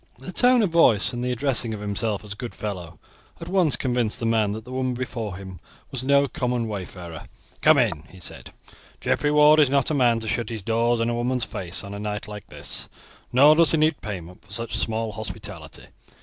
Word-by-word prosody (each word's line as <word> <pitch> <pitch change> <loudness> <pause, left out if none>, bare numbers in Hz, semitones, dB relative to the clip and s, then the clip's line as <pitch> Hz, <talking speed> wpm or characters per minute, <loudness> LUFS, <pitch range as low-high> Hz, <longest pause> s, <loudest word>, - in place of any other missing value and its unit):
The 130 +8 -8
tone 245 +3 +4
of 190 - 0
voice, 125 -8 +4
and 120 0 -3
the 125 - -1
addressing 125 -3 -1
of - - -8
himself 105 +1 -2
as 105 -1 -6
good 115 +3 -7
fellow, 90 -6 -6 0.4
at 165 - -8
once 180 -5 +2
convinced 125 -4 0
the 115 - -2
man 110 -2 +2
that 110 +1 -7
the 125 - -10
woman 130 -1 -1
before 115 -5 -4
him 95 -2 -9 0.3
was 130 -2 -4
no 140 +1 +4
common 125 -3 -1
wayfarer. 90 -5 -7 0.3
"Come 155 -1 +6
in," 95 - +1
he 95 - -14
said; 90 - -7 0.5
"Geoffrey 145 - +1
Ward 150 +1 +6
is 145 -3 +5
not 140 +1 +2
a - - +1
man 120 -5 +3
to 110 - -5
shut 115 0 -1
his 110 -4 -6
doors 115 +2 +1
in 115 - +1
a - - -1
woman's 120 +1 -1
face 90 0 -2
on 100 0 -7
a 100 - -6
night 105 0 -4
like 105 -1 -9
this, - - -4 0.4
nor 140 +5 +7
does 165 +1 +5
he - - +4
need 155 0 +2
payment 90 -4 -7
for - - -23
such 115 0 -4
small 110 0 -1
hospitality. 105 -1 -8
115 Hz, 215 wpm, -24 LUFS, 105-135 Hz, 0.5 s, nor